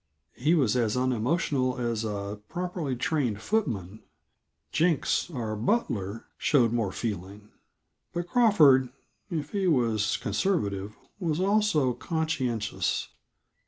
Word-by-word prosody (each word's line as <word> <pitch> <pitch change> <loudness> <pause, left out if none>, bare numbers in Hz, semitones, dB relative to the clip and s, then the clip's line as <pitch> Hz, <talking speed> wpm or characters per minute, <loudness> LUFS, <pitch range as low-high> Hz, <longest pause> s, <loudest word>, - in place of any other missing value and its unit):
He 155 +7 +2
was 130 -8 +2
as 115 -1 +1
unemotional 130 +1 0
as 115 -2 -1
a 100 -1 -4
properly 175 -6 -3
trained 125 -5 0
footman; 110 - -2 0.7
Jenks, 165 0 +1
our 115 -8 -3
butler, 110 - -1
showed 120 -6 +3
more 115 -5 0
feeling. 105 -1 -5 0.6
But 175 0 -3
Crawford, 155 - +5 0.4
if 155 -5 -3
he 195 -2 0
was 115 - +2
conservative, 105 - -1 0.2
was 165 -4 -1
also 195 -9 +2
conscientious. 130 - -1
130 Hz, 105 wpm, -28 LUFS, 110-165 Hz, 0.7 s, Crawford